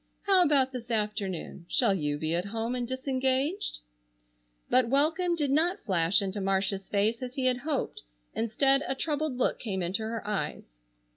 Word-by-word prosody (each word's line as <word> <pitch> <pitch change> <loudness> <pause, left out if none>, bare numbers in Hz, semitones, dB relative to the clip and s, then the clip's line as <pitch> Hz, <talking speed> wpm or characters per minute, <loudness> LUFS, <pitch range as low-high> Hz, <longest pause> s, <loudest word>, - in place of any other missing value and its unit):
"How 390 -2 +5
about 275 -5 +3
this 245 -2 -7
afternoon? 205 -6 -3
Shall 235 -6 +3
you 150 -5 -1
be 155 +2 -1
at 175 +2 0
home 225 +3 -2
and 245 -1 -2
disengaged?" 265 - -1 0.9
But 255 -2 +3
welcome 320 +6 +2
did 295 -4 0
not 335 +6 +2
flash 185 0 +3
into 195 +1 -3
Marcia's 195 0 -1
face 215 +4 +1
as 255 0 -6
he 265 -2 -1
had 255 -1 +3
hoped. 280 +1 -3 0.3
Instead 270 +5 +2
a 265 - -1
troubled 300 -1 -2
look 250 - 0
came 190 -5 -3
into 185 +6 -1
her 220 -1 -4
eyes. 205 - -3
240 Hz, 165 wpm, -29 LUFS, 200-275 Hz, 0.9 s, How